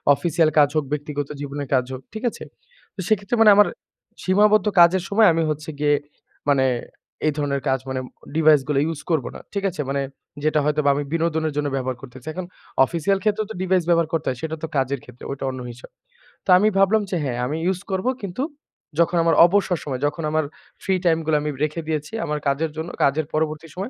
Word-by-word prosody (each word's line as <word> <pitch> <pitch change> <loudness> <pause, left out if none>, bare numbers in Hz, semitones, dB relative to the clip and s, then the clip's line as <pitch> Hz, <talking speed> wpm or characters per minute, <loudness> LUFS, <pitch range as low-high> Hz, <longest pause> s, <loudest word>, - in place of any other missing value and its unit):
Official 165 -1 +2
কাজ 145 -1 +6
হোক, 155 - +2
ব্যক্তিগত 145 -1 -3
জীবনের 145 0 -5
কাজ 125 -1 +3
হোক। 130 - -6
ঠিক 220 +3 -6
আছে? - - -10 0.5
তো - - -15
সেক্ষেত্রে 210 +1 +1
মানে 220 - +8
আমার 205 0 +6 0.6
সীমাবদ্ধ 210 +2 +4
কাজের 175 +1 +6
সময় 215 +1 +5
আমি 165 - +1
হচ্ছে 155 +2 -4
গিয়ে 145 0 +3 0.6
মানে 135 -2 +4 0.6
এই 155 - +2
ধরনের 140 -2 -1
কাজ 130 - +2
মানে 130 0 -2 0.4
ডিভাইস 155 -3 +5
গুলো 145 -2 +1
ইউস 160 -2 -4
করব 155 -7 +1
না। - - -7
ঠিক 200 - -2
আছে? 170 -4 -4
মানে 140 0 0 0.4
যেটা 155 0 +2
হয়তোবা 150 -1 +2
আমি 145 - -1
বিনোদনের 160 -2 0
জন্য 145 -1 0
ব্যবহার 130 -2 -2
করতে 130 -1 -11
চাই। 155 - -5
এখন 185 +1 -5 0.4
অফিসিয়াল 175 +6 0
ক্ষেত্রেও 215 0 +1
তো - - -5
ডিভাইস 185 -1 +2
ব্যবহার 170 -2 +3
করতে 160 -2 -1
হয়। 130 - -3
সেটা 160 0 -3
তো - - -1
কাজের 135 0 0
ক্ষেত্রে, 125 0 -15
ওইটা 140 - -5
অন্য 130 0 -5
হিসাব। 120 +2 -13 0.6
তো - - -8
আমি 205 +3 +3
ভাবলাম 195 +3 +4
যে 190 - -1
হ্যাঁ, 125 -4 -2
আমি 145 +5 -2
ইউস 185 0 +1
করব। 190 0 -1 0.2
কিন্তু 200 +4 -4 0.6
যখন 170 +1 +3
আমার 165 0 +3
অবসর 185 0 +2
সময়, 135 -3 -4
যখন 155 +3 -4
আমার 155 0 +2 0.4
ফ্রি 190 - +1
টাইম 165 -2 +4
গুলো 155 0 +2
আমি 150 - -2
রেখে 155 +2 -1
দিয়েছি। 155 +1 -3
আমার 150 -1 -2
কাজের 150 +3 0
জন্য, 160 +2 -4
কাজের 145 +3 +2
পরবর্তী 155 +1 -1
সময় 195 +5 -4
155 Hz, 205 wpm, -22 LUFS, 145-180 Hz, 0.6 s, মানে